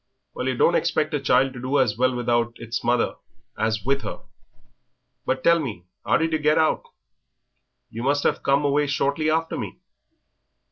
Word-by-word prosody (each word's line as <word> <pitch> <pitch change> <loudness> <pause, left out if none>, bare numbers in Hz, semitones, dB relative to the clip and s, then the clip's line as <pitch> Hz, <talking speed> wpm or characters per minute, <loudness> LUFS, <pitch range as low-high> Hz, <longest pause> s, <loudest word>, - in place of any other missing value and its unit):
"Well, 130 - -4
yer 130 - 0
don't 170 - +3
expect 155 -2 0
a 145 - +1
child 135 0 +2
to 125 - -8
do 130 +3 0
as 125 -6 +2
well 130 +2 +1
without 120 -1 0
its 115 0 -5
mother 120 0 +1 0.4
as 110 -1 -1
with 135 +1 +1
her. 105 - -6 1.1
But 130 0 -1
tell 170 0 +5
me, 110 - -5 0.2
how - - +3
did 165 0 0
yer 155 - +1
get 150 +1 +2
out? 160 -1 +2 1.1
You 115 - -6
must 145 +3 +1
have - - +1
come 140 +1 +2
away 145 +1 +2
shortly 140 +3 0
after 165 +1 0
me." - - -6
135 Hz, 180 wpm, -23 LUFS, 120-150 Hz, 1.1 s, tell